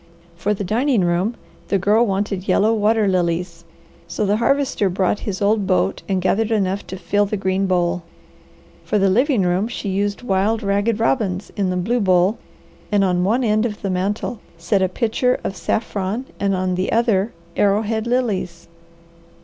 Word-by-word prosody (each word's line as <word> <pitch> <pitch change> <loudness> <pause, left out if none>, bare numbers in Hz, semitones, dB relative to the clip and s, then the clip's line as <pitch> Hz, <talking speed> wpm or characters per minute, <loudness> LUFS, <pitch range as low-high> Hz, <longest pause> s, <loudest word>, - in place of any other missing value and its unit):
For 200 +5 -1
the 200 - -4
dining 235 +4 +1
room, 175 +6 0 0.3
the 200 - +1
Girl 210 +5 +3
wanted 195 -1 -2
yellow 220 +2 +3
water 215 0 +2
lilies, 170 -2 -1 0.4
so 170 +5 -2
the 205 +1 +2
Harvester 255 -3 +1
brought 185 +2 0
his 195 0 -3
old 205 -1 +2
boat 185 0 +1
and 190 -2 0
gathered 215 +4 +1
enough 200 -3 -1
to 190 - -6
fill 205 +2 0
the 210 - -2
green 190 0 0
bowl. 175 -1 +1 0.8
For 210 - 0
the 195 -1 +3
living 245 0 +2
room, 180 +4 +1
she 230 -3 -5
used 200 +3 -1
wild 215 +1 0
ragged 205 +3 0
robins 210 -5 0
in 195 -3 0
the 180 - -1
blue 225 +7 0
bowl, 185 +1 +2 0.5
and 205 -1 +3
on 180 -2 +1
one 230 +7 +1
end 215 -1 +2
of 210 -4 -4
the 195 - -1
mantel 200 +5 -2 0.2
set 175 +4 0
a 185 - +2
pitcher 240 +4 0
of 195 - -3
saffron 210 +3 -2
and 200 -1 +1
on 185 0 -1
the 185 +1 -1
other 225 -2 +2 0.2
arrowhead 215 +2 +1
lilies. 205 -9 -1
200 Hz, 175 wpm, -20 LUFS, 185-220 Hz, 0.8 s, Girl